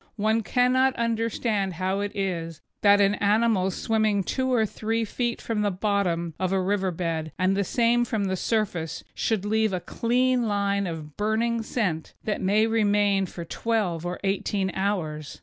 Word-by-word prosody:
One 220 +2 +2
cannot 255 +3 +2
understand 225 -3 -1
how 185 +3 -1
it 205 0 -2
is 170 -5 -3 0.2
that 205 0 +6
an 200 0 +4
animal 210 -2 +2
swimming 215 0 +1
two 260 +6 -1
or 230 -3 +3
three 225 +2 -2
feet 240 +2 -2
from 220 -2 -2
the 205 - +2
bottom 185 -4 -1
of 185 0 0
a 195 - +2
river 190 0 0
bed 165 -2 -3
and 185 +1 +2
the 200 - +1
same 235 +4 +2
from 220 -3 -1
the 190 -1 0
surface 180 -6 -2
should 215 -3 -1
leave 220 -1 +1
a 185 - 0
clean 245 +4 +1
line 200 -1 0
of 155 -3 -7
burning 225 +2 0
scent 195 -9 -2
that 210 - -2
may 205 +3 +3
remain 205 -3 +2
for 170 -1 -7
twelve 195 -5 -1
or 175 0 -4
eighteen 195 0 0
hours. 160 -7 -2
205 Hz, 165 wpm, -25 LUFS, 185-225 Hz, 0.2 s, that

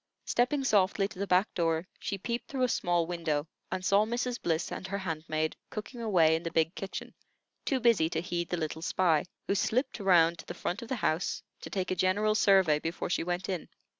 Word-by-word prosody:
Stepping 260 +4 +1
softly 195 -4 +3
to 190 - -12
the 200 - -1
back 185 +3 +3
door, 165 0 0
she 200 - -3
peeped 235 +5 -3
through 270 -5 -1
a - - +4
small 175 -7 +1
window, 165 -3 -2 0.2
and 185 0 -3
saw 200 +2 +5
Mrs. 240 +2 -2
Bliss 165 0 -1
and 185 - -5
her 200 +1 -2
handmaid 155 -4 -2
cooking 230 +3 -6
away 170 -8 +4
in 160 - -2
the 170 - -3
big 160 +1 +1
kitchen, 195 -1 -6 0.5
too 270 -4 +1
busy 230 -10 +4
to 160 - -1
heed 175 0 -3
the 175 - -1
little 160 0 -3
spy, 165 -2 +2 0.2
who - - +1
slipped 235 +6 0
around 170 -4 +4
to - - -9
the - - -6
front 180 +5 -3
of 235 - -7
the 260 - -1
house, 160 +4 0 0.2
to - - -8
take 185 -2 -2
a - - +1
general 200 +4 +2
survey 190 -8 +4
before 165 +2 -3
she - - +1
went 175 +1 -2
in. 185 -4 -3
185 Hz, 215 wpm, -30 LUFS, 165-210 Hz, 0.5 s, saw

